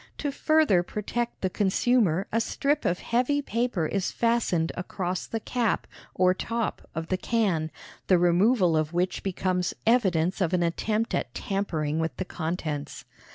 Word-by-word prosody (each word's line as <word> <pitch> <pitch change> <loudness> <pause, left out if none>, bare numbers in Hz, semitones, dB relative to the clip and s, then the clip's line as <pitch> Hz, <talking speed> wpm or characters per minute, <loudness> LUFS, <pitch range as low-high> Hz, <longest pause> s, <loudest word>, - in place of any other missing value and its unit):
To 290 - -2
further 305 - +3
protect 235 +6 -3
the 190 - +1
consumer 200 -2 +2
a 230 - +2
strip 285 +6 0
of 175 - +2
heavy 250 +5 +1
paper 235 - -1
is 190 +4 -1
fastened 230 -8 +1
across 180 0 -3
the 225 - -3
cap, 230 -1 -1 0.3
or 185 0 +4
top, 230 +4 -3
of 160 +1 -4
the 185 - +1
can, 185 -8 0 0.4
the 185 - +5
removal 180 +1 +3
of 155 +1 0
which 180 +2 0
becomes 185 -1 -1
evidence 190 -6 +2
of 180 -1 +1
an 175 -1 +2
attempt 215 +6 -1
at - - -2
tampering 160 -8 -1
with 160 -5 -2
the 185 - -3
contents. 160 -4 -4
185 Hz, 155 wpm, -27 LUFS, 175-230 Hz, 0.4 s, the